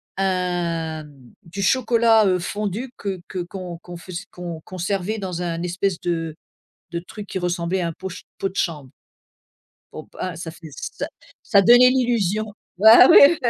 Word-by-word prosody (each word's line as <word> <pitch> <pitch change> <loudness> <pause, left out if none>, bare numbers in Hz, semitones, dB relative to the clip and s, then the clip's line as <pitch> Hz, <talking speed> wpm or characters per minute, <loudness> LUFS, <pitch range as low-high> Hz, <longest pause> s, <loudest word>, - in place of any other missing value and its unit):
un 175 -4 -1
m 145 -3 -17 0.2
du 185 +4 -7
chocolat, 230 -1 +4
heu, 185 -1 +2
fondu 210 +7 -4
que 195 -3 -4
que 185 - -5
qu'on 175 -1 -6
qu'on 175 -1 -10
fais 180 +1 -11 0.2
qu'on 170 -3 -7
qu'on 185 - -10
servait 195 +4 -2
dans 180 -3 -4
un 170 -1 -3
espèce 180 +1 -1
de 165 -2 -2 0.6
de 170 - -3
truc 205 +4 -9
qui 190 - -4
ressemblait 175 +1 -1
à 170 - -1
un - - -4
pot 190 0 -7
ch 180 - -10
pot 195 - -2
de 190 - -16
chambre. 150 -6 -2 1.0
Bon - - -7
b - - -26
hein, 180 -2 -3
ça 165 -1 -6
fait 160 -1 -12
ça - - -5 0.4
ça 200 -3 +4
donnait 245 +4 +7
l'illusion 225 -5 +1 0.3
bah 220 +5 +9
ouais 300 +4 +8
oui 240 - +2
185 Hz, 180 wpm, -22 LUFS, 170-205 Hz, 1.0 s, bah